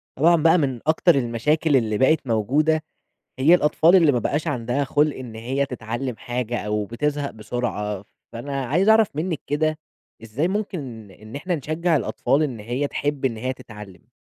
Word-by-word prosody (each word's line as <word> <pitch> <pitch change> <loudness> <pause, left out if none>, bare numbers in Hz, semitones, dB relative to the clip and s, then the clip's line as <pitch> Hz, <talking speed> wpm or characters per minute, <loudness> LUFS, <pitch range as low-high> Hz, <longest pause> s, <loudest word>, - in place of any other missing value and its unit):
طبعًا 170 +5 +5
بقى 165 +2 +4
من 135 -6 -1
أكتر 160 +2 +4
المشاكل 140 +5 +1
اللي 110 -4 +1
بقِت 140 +3 +2
موجودة 145 +8 +1 0.6
هي 150 +6 +6
الأطفال 165 +1 +4
اللي 165 -5 +5
ما 125 - +1
بقاش 145 +6 -1
عندها 125 +4 -1
خُلق 145 +2 +1
إن 125 -4 -8
هي 130 +5 -2
تتعلّم 120 0 -5
حاجة 120 0 -3
أو 105 0 -1
بتزهَق 145 +6 -2
بسرعة، 105 -2 -4 0.3
فأنا 135 +3 -4
عايز 180 - +1
أعرَف 220 -1 +6
منِك 165 0 -2
كده. 155 +2 0 0.4
إزاي 120 +10 -2
ممكن 145 - -4
إن 110 +6 -11
إحنا 175 +5 -2
نشجّع 160 +3 0
الأطفال 140 +1 0
إن 130 -7 -3
هي 120 +7 -2
تحِب 145 -1 -3
إن 120 -4 0
هي 130 +4 -2
تتعلّم؟ 105 -8 -13
135 Hz, 165 wpm, -23 LUFS, 115-155 Hz, 0.6 s, هي